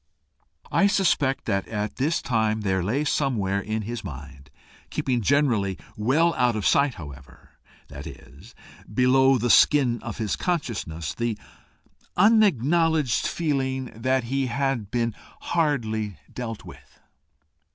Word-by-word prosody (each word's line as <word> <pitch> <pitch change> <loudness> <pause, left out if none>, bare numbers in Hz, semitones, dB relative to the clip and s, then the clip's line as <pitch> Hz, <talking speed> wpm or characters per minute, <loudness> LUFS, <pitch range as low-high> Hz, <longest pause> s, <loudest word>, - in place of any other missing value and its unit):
I 200 - +4
suspect 165 -9 +1
that 100 -3 -1
at 105 -1 -4
this 150 +6 0
time 110 -3 0
there 95 -2 0
lay 125 +11 0
somewhere 110 -10 0
in 110 +2 -3
his 120 +3 -5
mind, 70 0 -10 0.4
keeping 125 -2 -1
generally 115 -7 +1 0.2
well 150 +11 +2
out 125 -2 +1
of 105 - -3
sight 140 -2 +3
however, 65 -6 -12 0.4
that 70 +2 -9
is, 70 - -13 0.4
below 130 +3 +4
the 120 0 +1
skin 130 -5 +4
of - - -6
his 110 -3 -1
consciousness, 110 - -3
the 115 -2 -2 0.8
unacknowledged 165 - +3
feeling 130 -5 -2
that 130 +3 0
he 135 +2 -1
had 125 -4 -1
been 115 -1 -1 0.3
hardly 110 - -1 0.2
dealt 115 -3 -6
with. - - -15
120 Hz, 125 wpm, -25 LUFS, 105-140 Hz, 0.8 s, I